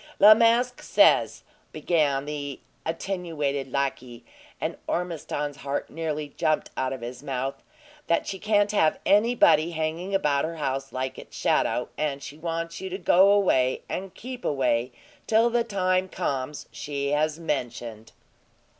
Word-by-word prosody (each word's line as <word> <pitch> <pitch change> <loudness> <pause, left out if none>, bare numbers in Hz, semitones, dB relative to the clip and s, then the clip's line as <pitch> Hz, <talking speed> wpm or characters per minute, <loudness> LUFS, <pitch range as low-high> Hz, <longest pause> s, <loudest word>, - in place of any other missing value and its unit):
"La 210 +1 +10
Masque 235 +2 +2
says," - - +3 0.3
began 145 -5 +1
the 145 -2 -5 0.3
attenuated 160 -6 -3
lackey, 130 -3 -3 0.3
and - - -2
Ormiston's 150 -4 -3
heart 140 +1 -4
nearly 155 -2 -3
jumped 155 +2 -1
out 130 0 -1
of 130 -2 -5
his 125 +1 -7
mouth, 135 -1 -3 0.5
"that 170 - +2
she 190 - -5
can't 205 0 +2
have 160 -7 +3
anybody 205 -6 +4
hanging 165 +4 -2
about 145 -7 +2
her 165 +1 -3
house 135 -3 -3
like 130 0 -4
its 60 - -11
shadow; - - +1
and 140 -2 -2
she 140 - -8
wants 165 +1 -4
you 190 - -4
to 185 - -4
go 195 0 +5
away, 130 -11 +2
and 190 0 -5
keep 250 0 -8
away, 125 -3 +1 0.4
till 225 +2 +4
the 235 0 +2
time 185 -3 0
comes 140 -1 -3
she 140 -1 -3
has 155 +2 +1
mentioned." 120 -7 -4
155 Hz, 145 wpm, -26 LUFS, 135-185 Hz, 0.5 s, La